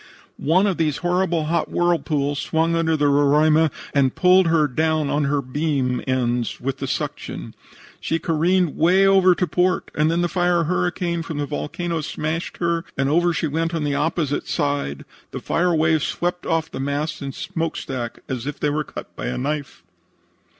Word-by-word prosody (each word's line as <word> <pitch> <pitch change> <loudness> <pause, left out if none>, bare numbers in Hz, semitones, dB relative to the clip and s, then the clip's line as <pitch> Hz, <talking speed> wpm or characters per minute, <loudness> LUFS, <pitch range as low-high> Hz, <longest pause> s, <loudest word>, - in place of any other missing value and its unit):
"One 180 +7 +3
of 195 -4 0
these 155 -3 0
horrible 175 -2 +1
hot 170 +2 0
whirlpools 150 -5 0
swung 165 +1 0
under 160 -1 +1
the 145 - +1
Roraima 150 +3 +4 0.2
and 135 -3 +2
pulled 185 0 +5
her 160 -2 +3
down 155 +1 0
on 145 0 +1
her 140 0 0
beam 130 -2 -1
ends 125 -2 0
with 135 +1 -3
the 135 - -3
suction. - - -4 0.5
She 165 - -1
careened 165 +1 +1
way 185 +4 +4
over 190 -2 +5
to 180 - 0
port, 180 +3 0
and 155 +1 +2
then 170 +1 +1
the 175 - +2
fire 175 -1 +1
hurricane 175 0 -1
from 165 -2 -6
the 145 - -1
volcano 165 +3 -3
smashed 155 +2 -4
her, 170 -1 0
and 135 0 +1
over 175 +3 +3
she 165 - -1
went 165 +3 -1
on 160 - -1
the 145 -1 0
opposite 145 0 -1
side. 140 - -2 0.2
The - - -6
fire 175 0 +1
wave 160 0 +2
swept 175 +4 -2
off 165 -1 0
the - - -6
masts 145 +3 -2
and 135 -1 -5
smokestack 160 -8 -4
as 130 -1 -4
if 145 - -5
they 145 - +1
were 155 +1 -1
cut - - -9
with - - -5
a 60 - -2
knife. 145 - -4
155 Hz, 180 wpm, -22 LUFS, 145-170 Hz, 0.5 s, pulled